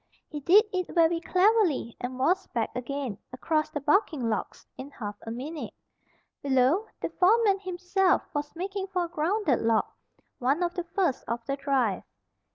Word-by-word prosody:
He 300 - -4
did 380 - +6
it 365 -1 -1
very 335 0 +4
cleverly, 365 - +2
and 250 +1 -4
was 360 +9 +1
back 230 -2 -2
again, 255 -3 -4
across 305 +4 -1
the 295 - -4
bucking 295 - +1
logs, 220 - -3
in 265 +2 -8
half 205 -7 -6
a - - -2
minute. 280 +7 -6 0.7
Below, 275 - +2
the - - -3
foreman 400 +1 +3
himself 370 0 +1
was 290 +1 -4
making 385 +2 -4
for 365 -2 -1
a - - -3
grounded 335 - +1
log, 225 -1 +2 0.5
one 275 +8 +1
of 345 0 -1
the 355 -2 -4
first 345 -5 -1
of 235 0 -3
the 275 - -1
drive. 270 -8 0
310 Hz, 165 wpm, -27 LUFS, 260-370 Hz, 0.7 s, did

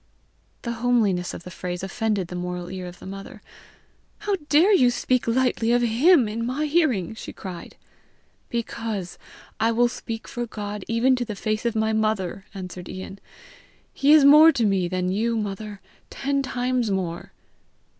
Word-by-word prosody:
The 235 - -2
homeliness 215 -8 +2
of - - -8
the 180 - -9
phrase 180 0 -5
offended 205 -1 -1
the 180 - -6
moral 180 0 -4
ear 185 -1 -5
of 180 0 -10
the - - -13
mother. 195 +1 -8 0.8
"How 415 -1 -1
dare 340 +8 +5
you 255 -10 +5
speak 250 0 0
lightly 235 -1 +1
of 245 0 +3
HIM 250 +4 +4
in 225 +2 -3
my 260 +6 -1
hearing!" 290 - +1
she 220 - -8
cried. 180 -3 -9 0.7
"Because 225 -5 -4 0.4
I 225 +1 +3
will 240 +1 +3
speak 225 -2 -6
for 240 -1 -4
God 210 -2 -6
even 240 +3 +3
to 245 - -1
the 220 -3 -5
face 215 +3 -1
of 230 - -2
my 220 0 +1
mother!" 210 -4 -1
answered 180 -1 -7
Ian. 190 +1 -8 0.7
"He 280 +1 +3
is 305 -2 +7
more 305 +3 +9
to 240 -7 0
me 195 -3 +1
than 180 0 -1
you, 230 +4 0
mother 205 -1 -5 0.3
ten 280 0 -1
times 250 -3 -1
more." 180 -3 -3
220 Hz, 165 wpm, -24 LUFS, 190-245 Hz, 0.8 s, more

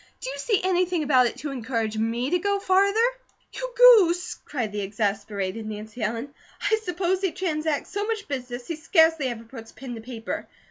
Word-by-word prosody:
"Do 260 - -4
you 280 - -7
see 415 +6 +1
anything 360 -2 +1
about 260 -4 +4
it - - -6
to 290 - -5
ENCOURAGE 230 -4 -2
me 235 +4 -1
to 360 - +3
go 400 +2 +1
farther?" 395 +2 +3 0.5
"You - - -5
Goose!" 405 -9 +7
cried 240 -7 -4
the 205 0 -3
exasperated 200 0 -2
Nancy 215 +2 -7
Ellen. 230 +6 -2 0.4
"I 440 - +5
suppose 365 -1 -1
he 385 -3 +1
transacts 310 -5 -2
so 410 +1 -2
much 445 -2 -3
business 250 -3 -5
he 330 - -4
scarcely 320 -3 +3
ever 235 -2 -5
puts 225 -1 -11
pen 250 +1 -8
to 225 - -7
paper. 225 -1 -5
280 Hz, 185 wpm, -25 LUFS, 225-365 Hz, 0.5 s, Goose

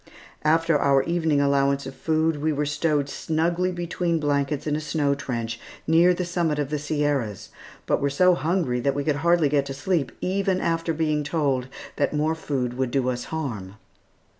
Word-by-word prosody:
After 165 0 +3
our 135 -1 +3
evening 160 -3 +1
allowance 140 -1 +2
of 135 - -6
food 160 +1 0
we 155 +2 0
were 150 0 -1
stowed 145 -1 0
snugly 170 +5 0
between 175 -1 -1
blankets 145 -1 0
in 150 -1 0
a - - -1
snow 150 -2 0
trench 115 -5 -4 0.3
near 165 +3 +5
the 180 0 -1
summit 170 -3 0
of 145 -1 -2
the 150 - -1
Sierras, 145 -8 -1 0.4
but - - +1
were 140 - +2
so 180 +6 +4
hungry 165 -7 0
that 140 +3 0
we 145 - -1
could 145 0 0
hardly 170 0 +3
get 140 -1 +1
to 135 - -5
sleep, 155 +1 -1
even 190 0 0
after 165 -1 0
being 155 -2 0
told 140 -4 0 0.3
that 145 +1 0
more 155 +2 +1
food 135 -6 -2
would 130 -2 +1
do 130 0 0
us 125 -1 -3
harm. 115 -12 -5
150 Hz, 185 wpm, -24 LUFS, 140-165 Hz, 0.4 s, near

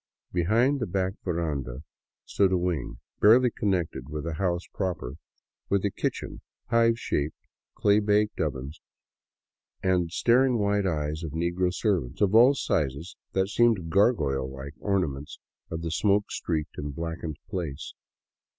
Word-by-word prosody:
Behind 115 +11 +2
the 120 - -2
back 95 +1 -1
veranda 75 -7 -3 0.4
stood 95 -2 +2
a 95 - +3
wing, 85 -9 -2 0.2
barely 120 +3 +6
connected 85 - -2
with 75 0 -4
the 85 0 -3
house 90 0 -1
proper, 90 -8 -3 0.5
with 100 0 +1
a 100 - +1
kitchen, - - -4 0.3
hive 115 0 +4
shaped 75 -8 -2 0.4
clay 100 0 +4
bake 105 0 +2
ovens, 70 0 -3 1.0
and 90 -2 +2
the - - -12
staring 125 +7 +3
white 100 -1 +1
eyes 75 -2 -2
of 80 -3 -5
negro 85 +2 0
servants 90 - -1
of 100 -1 +2
all 125 +5 +7
sizes 80 - -1 0.2
that 95 0 +1
seemed 105 -8 +2
gargoyle 80 - +2
like 65 +1 -8
ornaments 80 -9 -2 0.3
of 80 0 -4
the 80 - -2
smoke 100 +3 +2
streaked 80 -3 -3
and 75 -1 -5
blackened 80 -1 -4
place. 85 -7 -5
90 Hz, 140 wpm, -27 LUFS, 75-105 Hz, 1.0 s, all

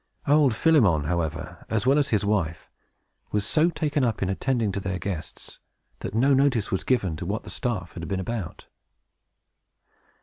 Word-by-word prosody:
Old 145 -5 +4
Philemon, 110 - +4
however, 85 0 -3
as 110 0 0
well 135 +3 +4
as 145 - +1
his 105 -2 +1
wife, 90 -6 -1 0.6
was 105 -1 0
so 155 +9 +3
taken 150 -3 -1
up 115 -5 0
in 95 - 0
attending 115 0 0
to 100 - -3
their 95 -1 -3
guests, 90 -4 -7 0.4
that - - -5
no 135 +5 +4
notice 135 -6 +2
was 95 - -1
given 100 -11 +1
to 85 - -5
what 105 +4 -2
the - - -9
staff 105 -8 -3
had 85 -1 -7
been 95 - -2
about. 100 -2 -5
105 Hz, 170 wpm, -25 LUFS, 95-135 Hz, 0.6 s, Old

